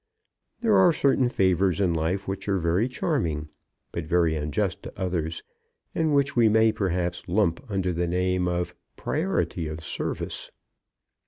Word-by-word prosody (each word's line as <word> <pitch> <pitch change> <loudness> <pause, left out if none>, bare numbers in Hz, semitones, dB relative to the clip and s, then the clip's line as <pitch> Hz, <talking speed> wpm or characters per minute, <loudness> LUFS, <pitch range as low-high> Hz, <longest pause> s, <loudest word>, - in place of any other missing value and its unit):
There 220 -4 +4
are 185 -2 +6
certain 135 -4 +2
favours 95 -3 +2
in 90 -4 +2
life 85 +5 -1
which 95 +1 -4
are 100 - +2
very 90 +7 +1
charming, 85 - -1 0.4
but 85 -2 -4
very 85 -1 +3
unjust 75 -1 -1
to - - -10
others, 85 -4 -2 0.5
and 160 -3 +1
which 140 0 +2
we 115 -3 +5
may 110 +1 +4
perhaps 90 -4 -2
lump 95 +3 +1
under 95 -3 0
the 85 +1 -1
name 90 +1 0
of 90 0 -1 0.2
priority 80 -2 -1
of 80 +1 -6
service. - - -4
90 Hz, 150 wpm, -26 LUFS, 85-110 Hz, 0.5 s, are